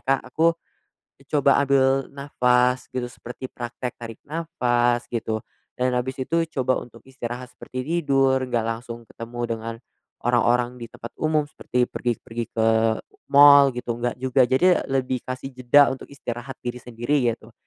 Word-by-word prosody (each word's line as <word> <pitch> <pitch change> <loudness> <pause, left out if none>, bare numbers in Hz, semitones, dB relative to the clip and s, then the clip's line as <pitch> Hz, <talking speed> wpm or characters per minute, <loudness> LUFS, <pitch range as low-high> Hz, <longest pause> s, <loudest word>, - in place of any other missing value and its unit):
Kak, 135 0 +2
aku 165 +3 +3 0.7
coba 140 -1 +4
ambil 135 -1 +2
nafas 125 -2 +1
gitu, 125 -1 -2
seperti 120 +1 -9
praktek 120 0 -5
tarik 115 -2 -9
nafas 120 -7 0
gitu, 110 -2 -2 0.4
dan 125 0 +1
habis 130 +2 -3
itu 165 +6 +1 0.2
coba 130 0 +1
untuk 115 -2 -13
istirahat 125 -1 -7
seperti 130 0 -6
tidur, 135 -5 +2
nggak 115 -2 0
langsung 115 0 -5
ketemu 120 +1 -7 0.2
dengan 115 +1 -6 0.5
orang-orang 120 0 +2
di 115 - -7
tempat 115 0 -10
umum 155 -1 +2
seperti 125 -4 -1
pergi-pergi 120 -1 -3
ke 110 0 +1 0.6
mal 140 -1 +8
gitu, 120 -1 -3
nggak 120 +1 -2
juga. 130 +1 +2
Jadi 180 +8 +3
lebih 130 -1 0
kasih 130 +1 -6
jeda 130 +2 +5
untuk 135 - -10
istirahat 120 -2 -6
diri 120 0 -4
sendiri 120 +2 0
gitu. 115 0 -7
125 Hz, 145 wpm, -24 LUFS, 120-135 Hz, 0.7 s, mal